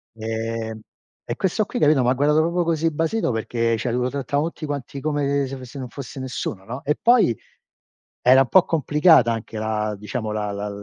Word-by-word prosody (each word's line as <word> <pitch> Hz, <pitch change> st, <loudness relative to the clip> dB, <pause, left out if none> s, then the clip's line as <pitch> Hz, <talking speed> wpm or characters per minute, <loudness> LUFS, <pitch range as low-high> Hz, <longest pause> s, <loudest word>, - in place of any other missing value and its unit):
Ehm, 110 Hz, 0 st, -4 dB, 0.5 s
e -, -, -4 dB
questo 190 Hz, +3 st, +1 dB
qui, 245 Hz, -, -4 dB
capito, 150 Hz, -3 st, +4 dB
m'ha 125 Hz, +1 st, +3 dB
guardato 150 Hz, +3 st, +3 dB
proprio 170 Hz, +2 st, +1 dB
così 165 Hz, 0 st, +1 dB
basito 165 Hz, +5 st, 0 dB
perché 115 Hz, 0 st, -1 dB
cioè 120 Hz, +2 st, -2 dB
lo 125 Hz, +1 st, 0 dB
trattavano 140 Hz, +3 st, -1 dB
tutti 165 Hz, -, -8 dB
quanti 140 Hz, -2 st, -5 dB
come 140 Hz, -1 st, 0 dB
se 135 Hz, -, -6 dB
fo 130 Hz, -, -9 dB
se 130 Hz, +3 st, -9 dB
non 130 Hz, -, -5 dB
fosse 135 Hz, +2 st, -8 dB
nessuno, 125 Hz, -6 st, -5 dB
no? 125 Hz, +5 st, -7 dB
E 150 Hz, -, +1 dB
poi 235 Hz, -, +5 dB, 0.9 s
era 130 Hz, +2 st, +6 dB
un 130 Hz, -, -4 dB
po' 185 Hz, +4 st, +6 dB
complicata 150 Hz, -4 st, +4 dB
anche 115 Hz, 0 st, -6 dB
la 110 Hz, -1 st, -1 dB
diciamo, 110 Hz, +2 st, -4 dB
la 105 Hz, -1 st, -2 dB
la 100 Hz, +1 st, -4 dB
130 Hz, 195 wpm, -22 LUFS, 115-150 Hz, 0.9 s, era